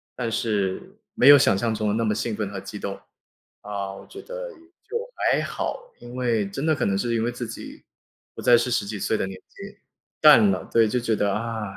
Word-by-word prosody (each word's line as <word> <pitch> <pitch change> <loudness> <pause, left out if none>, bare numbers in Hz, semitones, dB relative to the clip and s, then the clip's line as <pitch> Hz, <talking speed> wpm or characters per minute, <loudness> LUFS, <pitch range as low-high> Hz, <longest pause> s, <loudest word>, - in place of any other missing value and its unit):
但 115 -2 -3
是 105 -4 -2 0.2
没 125 - +4
有 145 - +11
想 95 - +3
像 115 +2 0
中 110 0 -2
的 105 - 0
那 115 0 0
么 105 - +1
兴 110 0 -2
奋 105 -2 -3
和 100 -1 -6
激 100 +2 -8
动。 100 -1 -5 0.6
啊， 100 -1 -5
我 - - -12
觉 400 - -10
得 - - -7 0.3
就 465 +3 -4 0.3
还 - - +2
好， - - -5
因 120 +1 -11
为 115 -5 0
真 135 +9 -4
的 160 - +3
可 - - -1
能 95 -1 +1
是 120 +3 -1
因 115 - 0
为 120 - 0
自 120 0 -5
己 110 - -9 0.5
不 - - -9
再 120 -1 +6
是 120 +1 -1
十 105 - 0
几 105 0 -5
岁 110 - 0
的 - - -1
年 95 -1 -8
纪。 200 +1 -11 0.4
淡 140 -10 +8
了， 95 - -2
对， 115 -1 +5
就 125 - -1
觉 115 -1 -1
得， 100 -1 0
啊， 115 0 -3
115 Hz, 250 characters per minute, -24 LUFS, 100-125 Hz, 0.6 s, 有